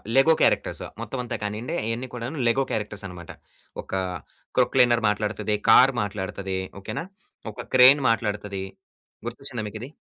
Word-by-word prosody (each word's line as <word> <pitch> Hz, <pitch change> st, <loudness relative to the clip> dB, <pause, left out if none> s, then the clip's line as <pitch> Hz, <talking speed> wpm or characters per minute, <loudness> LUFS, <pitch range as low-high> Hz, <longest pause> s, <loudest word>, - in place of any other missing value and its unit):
Lego 150 Hz, +5 st, +6 dB
characters -, -, +1 dB, 0.2 s
మొత్తం 135 Hz, -, -5 dB
అంతా 120 Hz, -, -4 dB
కానియండి, 105 Hz, +4 st, -3 dB
అయన్ని 115 Hz, +3 st, -2 dB
కూడాను 125 Hz, +5 st, -5 dB
లెగో 135 Hz, +4 st, +3 dB
క్యారెక్టర్సన్నమాట. 100 Hz, -5 st, -5 dB, 0.5 s
ఒక -, -, -16 dB, 0.7 s
క్రొక్‌లైనర్ 125 Hz, -2 st, +4 dB
మాట్లాడతది, 105 Hz, 0 st, -1 dB
కారు 130 Hz, +1 st, +7 dB
మాట్లాడతది. 95 Hz, -1 st, -4 dB, 0.2 s
ఓకేనా? 165 Hz, -, -5 dB, 0.5 s
ఒక -, -, -8 dB
క్రేన్ 130 Hz, +3 st, +8 dB
మాట్లాడతది. 105 Hz, -3 st, -1 dB, 0.6 s
గుర్తొచ్చింద 120 Hz, 0 st, -6 dB
మీకిది? 110 Hz, +5 st, -7 dB
115 Hz, 120 wpm, -25 LUFS, 105-125 Hz, 0.7 s, క్రేన్